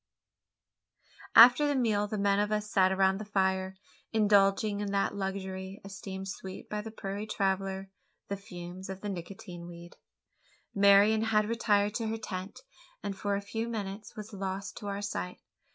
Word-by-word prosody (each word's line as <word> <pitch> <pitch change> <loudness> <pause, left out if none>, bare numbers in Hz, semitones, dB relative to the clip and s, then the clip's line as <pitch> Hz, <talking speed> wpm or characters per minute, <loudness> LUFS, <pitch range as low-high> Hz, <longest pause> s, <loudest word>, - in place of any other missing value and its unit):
After 245 +5 +9
the 290 - +1
meal 215 -5 +2
the 215 - -3
men 200 0 +2
of 205 0 0
us 210 0 -1
sat 190 -1 +4
around 190 0 +3
the - - -4
fire, 190 -2 0 0.4
indulging 205 -1 +3
in 205 -1 -2
that 200 0 +1
luxury 190 0 -4
esteemed 195 -1 -7
sweet 190 -1 -7
by 210 0 -3
the 220 - -7
prairie 205 -1 -5
traveller 195 -1 -1 0.4
the 200 - -2
fumes 185 -1 -9
of 190 0 -6
the 205 - -4
Nicotian 175 -1 -7
weed. 175 0 -11 0.8
Marian 200 +2 +5
had 215 -1 +2
retired 210 -3 +2
to 225 0 -2
her 225 +1 -2
tent; 190 - -6 0.4
and, 200 - -3
for 200 +1 -1
a 200 - -2
few 225 +3 -4
minutes, 205 -2 -5
was 215 0 -8
lost 195 0 -4
to 205 - -7
our 200 0 -3
sight. 90 - -4
200 Hz, 165 wpm, -30 LUFS, 190-210 Hz, 0.8 s, After